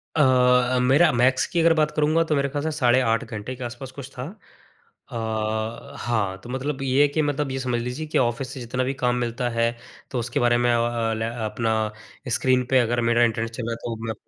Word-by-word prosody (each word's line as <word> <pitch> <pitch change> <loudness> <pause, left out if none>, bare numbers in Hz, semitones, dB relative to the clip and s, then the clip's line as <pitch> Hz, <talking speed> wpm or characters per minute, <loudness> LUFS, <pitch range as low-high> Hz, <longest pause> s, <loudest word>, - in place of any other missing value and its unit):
अ 155 - +3
अ, 125 -1 +4
मेरा 135 +7 +5
मैक्स 130 +2 +3
की 170 - -1
अगर 165 0 +5
बात 155 -1 +1
करूँगा 155 +2 +3
तो 160 -2 0
मेरे 140 0 +1
ख़याल 145 +1 -3
से 160 - -1
साढ़े 125 -3 +4
8 115 -2 +1
घंटे 110 +2 -6
के 125 - -8
आस-पास 120 +2 -7
कुछ 135 0 -9
था। 125 - -4 0.9
अ, 110 +3 -3
हाँ, 100 -5 -1
तो 120 - -10
मतलब 135 +2 -3
ये 135 +1 +2
है 145 - +6
कि 155 +2 0
मतलब 145 -1 -1
ये 135 - -3
समझ 125 -2 -1
लीजिए 125 +6 -4
कि 150 - -1
ऑफिस 125 +1 0
से 135 - -7
जितना 125 +1 -2
भी 130 +2 -1
काम 125 0 +3
मिलता 120 +1 -2
है, 115 0 +1 0.4
तो 125 - -1
उसके 120 +4 -2
बारे 120 -2 +3
में 120 0 +2
अ - - +3
अ, 115 -1 0
लै 110 0 -2 0.2
अपना 110 +1 -1 0.6
स्क्रीन 130 -1 +2
पे 130 - +6
अगर 120 0 +1
मेरा 120 0 +4
इंटरनेट 115 0 0
चल 115 +1 -6
रहा 115 - -3
है - - -3
तो 115 - -3
मैं 110 - -2
125 Hz, 235 wpm, -24 LUFS, 115-135 Hz, 0.9 s, है